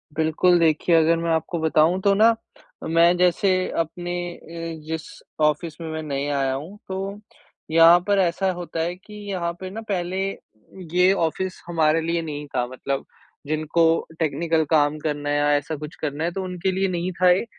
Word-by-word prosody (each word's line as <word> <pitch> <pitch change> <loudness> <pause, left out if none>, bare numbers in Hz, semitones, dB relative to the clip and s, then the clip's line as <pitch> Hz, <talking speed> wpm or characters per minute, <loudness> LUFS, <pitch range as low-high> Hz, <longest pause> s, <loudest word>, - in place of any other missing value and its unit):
बिल्कुल, 160 +3 +3
देखिए 165 +1 +3
अगर 165 +1 +4
मैं 165 0 -2
आपको 160 +1 -1
बताऊँ 160 +3 +3
तो 200 0 +4
ना 225 +3 +5 0.5
मैं 170 +2 +4
जैसे 180 +2 +3 0.3
अपने 175 +2 -3 0.2
अ, - - -16 0.5
जिस 160 0 -3 0.4
ऑफ़िस 150 +1 +1
में 165 - -5
मैं 160 0 -4
नहीं 140 -1 -3
आया 135 -2 0
हूँ 160 +10 -7
तो 195 +2 -4 0.5
यहाँ 165 +2 +7
पर 200 -1 +3
ऐसा 185 +1 +1
होता 175 -2 -6
है 175 +2 -2
कि 200 +3 -16 0.2
यहाँ 170 -3 -1
पे 185 0 -6
ना 220 +4 -6
पहले 185 0 -1 0.7
ये 180 +1 +5
ऑफ़िस 185 +2 -2
हमारे 160 -1 +2
लिए 165 +1 -1
नहीं 150 -2 -5
था 125 -1 +1
मतलब 135 +2 -4 0.4
जिनको 155 +2 +1 0.3
टेक्निकल 160 +1 +1
काम 150 -1 +3
करना 145 -1 -3
है 145 - +1
या 145 0 +2
ऐसा 145 +2 -2
कुछ 150 +1 -8
करना 150 +1 -2
है 170 - 0
तो 190 +1 -4
उनके 180 +1 -2
लिए 190 +1 0
नहीं 180 0 -2
था 180 - +6
ये। 185 +6 +2
165 Hz, 180 wpm, -23 LUFS, 155-180 Hz, 0.7 s, यहाँ